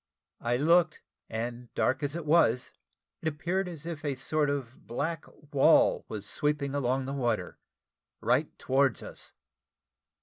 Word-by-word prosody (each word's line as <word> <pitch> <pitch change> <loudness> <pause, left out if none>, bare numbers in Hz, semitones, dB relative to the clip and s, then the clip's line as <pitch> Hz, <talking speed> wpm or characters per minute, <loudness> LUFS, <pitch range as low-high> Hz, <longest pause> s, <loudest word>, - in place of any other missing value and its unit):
I 120 +1 0
looked, 165 +3 +3 0.3
and 120 +2 -4
dark 130 +1 +1
as 145 +1 -2
it 170 -2 -4
was, 145 -6 +3 0.5
it 160 - -2
appeared 175 +5 -1
as 165 -3 -7
if 165 -3 -5
a 145 -3 -1
sort 145 +3 0
of 135 -4 -4
black 150 +6 -2 0.3
wall 135 - +5
was 105 -2 -6
sweeping 145 -2 0
along 130 -1 0
the 135 - -3
water 120 -5 -1 0.6
right - - +2
towards 135 -3 +2
us. - - -9
140 Hz, 140 wpm, -29 LUFS, 125-155 Hz, 0.6 s, wall